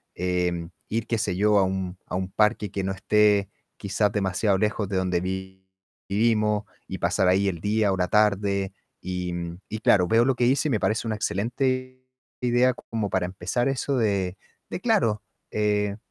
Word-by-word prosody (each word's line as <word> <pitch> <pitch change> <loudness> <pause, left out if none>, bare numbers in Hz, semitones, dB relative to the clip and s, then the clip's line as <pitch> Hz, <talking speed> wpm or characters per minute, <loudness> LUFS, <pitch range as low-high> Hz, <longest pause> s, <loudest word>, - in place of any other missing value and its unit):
em, 90 -2 -1 0.2
ir, 115 +1 -2
qué 115 - 0
sé 105 -4 -1
yo, 105 +1 +4
a - - +4
un 95 -1 -2
a - - -4
un 95 0 -2
parque 105 -1 +2
que 100 - -3
no 95 - -1
esté 100 +1 +3 0.3
quizás 100 +1 0
demasiado 95 0 +1
lejos 105 0 0
de 95 - -1
donde 90 -2 0
vi 95 0 -5 0.5
vivimos 105 0 +2 0.2
y - - -6
pasar 95 - +1
ahí 95 +2 +3
el 85 -3 -5
día 105 0 +2
o 95 - 0
la 90 0 +1
tarde. 100 -2 +2 0.3
Y 90 -1 -3 0.4
y 110 - -4
claro, 95 -4 +4
veo 115 +5 +4
lo 135 0 +2
que 125 - 0
dices 135 +5 +2
y - - 0
me 115 -6 +1
parece 110 +3 0
una 110 - -1
excelente 130 +5 -2 0.4
idea 125 +1 +3
como 110 -3 -4
para 95 -1 0
empezar 95 +7 -2
eso 135 0 -1
de 100 -5 0 0.3
de - - -4
claro, 190 - +2 0.3
eh, 105 -1 0
105 Hz, 185 wpm, -25 LUFS, 95-110 Hz, 0.5 s, yo